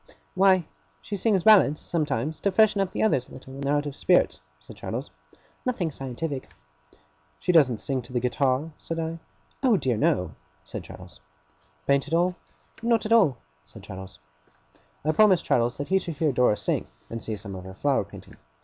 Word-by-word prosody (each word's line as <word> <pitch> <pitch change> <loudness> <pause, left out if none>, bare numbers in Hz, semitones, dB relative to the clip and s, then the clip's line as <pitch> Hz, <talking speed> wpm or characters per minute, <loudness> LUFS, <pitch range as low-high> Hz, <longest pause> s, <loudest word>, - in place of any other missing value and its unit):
'Why, 185 -2 +4 0.3
she 205 - -5
sings 195 -2 +2
ballads, 195 -9 +6
sometimes, 155 -2 -2
to 200 - +1
freshen 210 0 +4
up 195 - 0
the - - -2
others 135 - +1
a - - -14
little 130 0 -11
when 135 - -8
they're 140 +1 +1
out 145 0 0
of 145 -2 -5
spirits,' 180 +3 +2 0.2
said - - -13
Traddles. - - -5 0.5
'Nothing 205 -11 -1
scientific.' 135 +1 -5 0.9
'She - - +1
doesn't 140 -9 +5
sing 130 +3 -2
to 120 - -13
the 125 - 0
guitar?' 130 +4 0
said 165 - -5
I. 165 +1 -3 0.4
'Oh 250 -6 +4
dear 130 -7 0
no!' 90 -5 +1 0.3
said - - -7
Traddles. 90 -9 -12 0.7
'Paint 140 0 +2
at 160 - 0
all?' 175 +2 +2 0.5
'Not 230 -1 +2
at 215 - -3
all,' 185 - +5 0.3
said - - -15
Traddles. 95 0 -9 0.9
I 155 - +3
promised 195 +1 +4
Traddles 120 0 +1
that 145 +2 -5
he 190 0 +4
should 170 -4 -6
hear 150 0 +1
Dora 125 -4 +3
sing, - - -1 0.2
and 115 -2 -6
see 110 +2 -3
some 100 -1 -8
of 95 -1 -8
her 95 0 -9
flower 140 +2 +1
painting. - - -13
145 Hz, 185 wpm, -26 LUFS, 125-185 Hz, 0.9 s, ballads